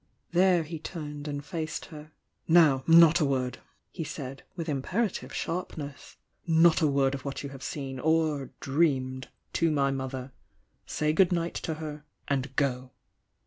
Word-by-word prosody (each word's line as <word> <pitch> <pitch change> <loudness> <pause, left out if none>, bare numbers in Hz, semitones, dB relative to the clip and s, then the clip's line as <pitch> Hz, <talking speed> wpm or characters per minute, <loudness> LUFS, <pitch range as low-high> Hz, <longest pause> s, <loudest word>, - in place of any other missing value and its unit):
There 180 -1 +4
he 160 +1 -6
turned 150 -3 -6
and 145 -1 -4
faced 160 -2 -4
her. 155 +1 -10 0.4
"Now, 155 -6 +5
not 165 0 +8
a 155 - +3
word!" 130 -3 -1 0.3
he 165 - -4
said, 135 -3 -6
with 170 -2 -4
imperative 175 - -1
sharpness. 155 -5 -5 0.3
"Not 165 0 +5
a 155 - +4
word 140 -1 +2
of 135 -2 -5
what 140 0 -5
you 140 - -5
have 135 -1 -10
seen, 135 -2 -5
or 155 -2 +1
— - - -47
dreamed 135 -3 0
— - - -45
to 165 - +2
my 140 -3 +2
mother! 130 -1 -4 0.6
Say 150 0 0
good 185 +2 +4
night 170 -1 0
to 160 - -3
her, 150 -1 -7 0.2
and 135 -1 -1
go!" 130 -2 -1
150 Hz, 165 wpm, -28 LUFS, 135-165 Hz, 0.6 s, not